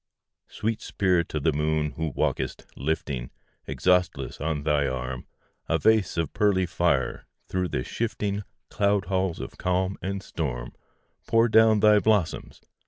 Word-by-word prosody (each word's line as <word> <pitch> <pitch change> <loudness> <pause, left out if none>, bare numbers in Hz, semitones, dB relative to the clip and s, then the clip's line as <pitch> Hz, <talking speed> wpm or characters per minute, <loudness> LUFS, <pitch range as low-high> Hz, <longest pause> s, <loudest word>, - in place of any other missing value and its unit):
II - - -62
Sweet 110 0 -3
Spirit 90 -4 +1
of 75 - -1
the 80 - +3
Moon, 75 0 0
who 80 0 -3
walkest, - - -1
lifting, 70 -4 -2 0.4
Exhaustless 90 -9 0
on 75 -1 -1
thy 75 -2 +2
arm, 65 -1 -4 0.4
A 80 - +3
vase 105 +1 +2
of 80 -3 -1
pearly 100 -3 +2
fire, 85 -6 0 0.2
through 90 -1 -1
the - - -2
shifting 105 -3 -2 0.3
Cloud 100 -1 +1
halls 95 -1 -1
of - - -8
calm 95 +1 0
and 95 +2 -3
storm, - - -4 0.5
Pour 115 +1 +4
down 110 -1 +5
thy 105 -1 +6
blossoms! 105 -6 0
90 Hz, 145 wpm, -26 LUFS, 75-100 Hz, 0.5 s, thy